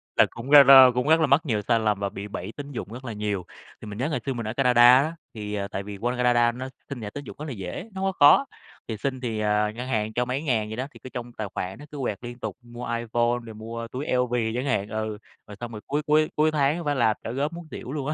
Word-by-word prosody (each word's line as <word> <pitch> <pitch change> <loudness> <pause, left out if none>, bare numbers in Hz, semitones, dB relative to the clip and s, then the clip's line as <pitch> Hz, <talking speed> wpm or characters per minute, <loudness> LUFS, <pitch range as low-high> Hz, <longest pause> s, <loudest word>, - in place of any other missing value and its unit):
là - - +6
cũng, 125 +5 -8
a, 145 -1 +11
la 135 -1 +10
cũng 125 +3 -1
rất 160 +1 +5
là 155 - +3
mắc 140 +4 +4
nhiều 110 -6 0
sai 115 -2 +3
lầm 105 -2 0
và 100 - -1
bị 100 +1 -7
bẫy 100 0 -6
tín 145 0 -7
dụng 115 -4 -6
rất 130 +2 -9
là 115 - -4
nhiều. 105 -3 -3 0.4
Thì - - -9
mình 105 0 -7
nhớ 130 +5 -1
ngày 150 - -1
xưa 135 - -1
mình 115 -3 -5
ở 110 - -3
Canada 125 -3 +3 0.2
á, 155 +4 0 0.2
thì, 105 -2 -6
ờ, 100 -1 -2
tại 100 0 -5
vì 100 0 -7
qua 120 +4 -1
Canada 120 -1 +3
nó 130 +2 -6 0.2
xin 140 -4 -6
thẻ 105 - -5
tín 145 +7 -8
dụng - - -10
rất 150 - -5
là - - -5
dễ, 100 - -6
nó 190 - -5
hông 195 0 +1
có 185 - -18
khó, 145 - +7 0.4
thì 110 - -4
xin 130 +3 -3
thì, 115 -4 -3
à, 105 0 +1
ngân 120 +3 -6
hàng 110 -3 -1
cho 125 +2 0
mấy 130 +3 -2
ngàn 115 -8 0
vậy 110 - -5
đó, 130 +2 -3
thì - - -15
cứ 130 - -8
trong 120 -1 -7
tài 110 -3 -4
khoản 95 +5 -4
nó 145 - -10
cứ 150 - -8
quẹt 105 -6 -2
liên 120 0 -8
tục, - - -5
mua 120 0 -9
iPhone 120 +1 0
rồi 110 - -9
mua 115 +2 -6
túi 130 +5 -5
LV 125 -1 +1 0.2
chẳng 125 +2 -2
hạn 115 -7 0
ừ, 110 -1 -3 0.3
rồi 105 - -10
xong 120 -1 -6
rồi 105 -2 -8
cuối 145 +2 0
cuối 155 0 +3
cuối 155 +1 +3
tháng, 145 0 +2
a, 175 - -5
phải 145 -1 +1
làm 115 -4 +3
trả - - -4
góp 140 +6 -2
muốn 170 -1 -9
xỉu 125 - -7
luôn 140 -2 -3
á. 155 - 0
120 Hz, 305 wpm, -25 LUFS, 110-140 Hz, 0.4 s, a